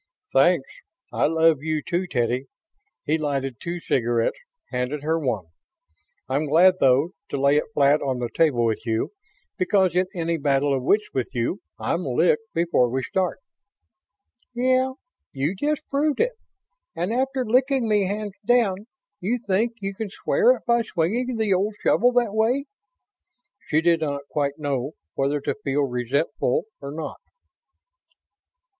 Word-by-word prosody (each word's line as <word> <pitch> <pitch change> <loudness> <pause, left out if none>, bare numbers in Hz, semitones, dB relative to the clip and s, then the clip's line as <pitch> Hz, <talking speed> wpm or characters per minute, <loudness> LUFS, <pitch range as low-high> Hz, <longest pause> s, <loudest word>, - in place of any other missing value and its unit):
"Thanks. - - +4 0.5
I - - +2
love 160 -2 +3
you, 155 -1 -2
too, 180 +1 -1
Teddy." 125 -2 0 0.6
He 160 +2 +1
lighted 135 -4 -2
two 175 +1 -4
cigarettes, 120 -6 0 0.3
handed 130 +3 -2
her 160 +2 +1
one. 120 - -2 0.8
"I'm 140 +4 0
glad, 180 +5 +5
though, 135 +6 +4 0.2
to 140 - -3
lay 140 +1 +4
it 150 - +1
flat 145 +1 +4
on 135 -3 -1
the 120 -1 -3
table 140 -8 +3
with 110 -2 -1
you, 115 -1 -1 0.5
because 185 -1 +2
in 185 +1 +2
any 165 -1 -1
battle 140 -1 +1
of 135 - 0
wits 210 +11 +2
with 130 -3 -1
you 120 - -1 0.2
I'm - - -1
licked 455 -1 +1
before 165 -8 +2
we 130 +2 -2
start." 185 +4 -1 1.2
"Yeah. 255 +1 +2 0.4
You 140 +6 -1
just 295 +8 -2
proved 290 +1 0
it. - - +2 0.6
And 175 +6 -1
after 265 +1 0
licking 255 +1 +2
me 210 -2 +2
hands 205 0 -3
down, 220 -4 +2 0.3
you 220 +7 0
think 225 +1 0
you 195 0 -2
can 210 +1 -5
square 485 - +3
it - - -13
by 235 0 +3
swinging 230 +6 -1
the 215 -3 +2
old 200 +3 0
shovel 245 +2 +4
that 240 -4 +2
way?" 235 +6 +1 1.0
She 155 +1 +2
did 165 -1 +3
not 140 -2 -2
quite 145 -2 -1
know 140 -1 -2 0.2
whether 140 +2 0
to - - -1
feel 140 +1 +1
resentful 125 +1 0 0.2
or 140 - -6
not. 155 0 -6
165 Hz, 150 wpm, -24 LUFS, 140-220 Hz, 1.2 s, glad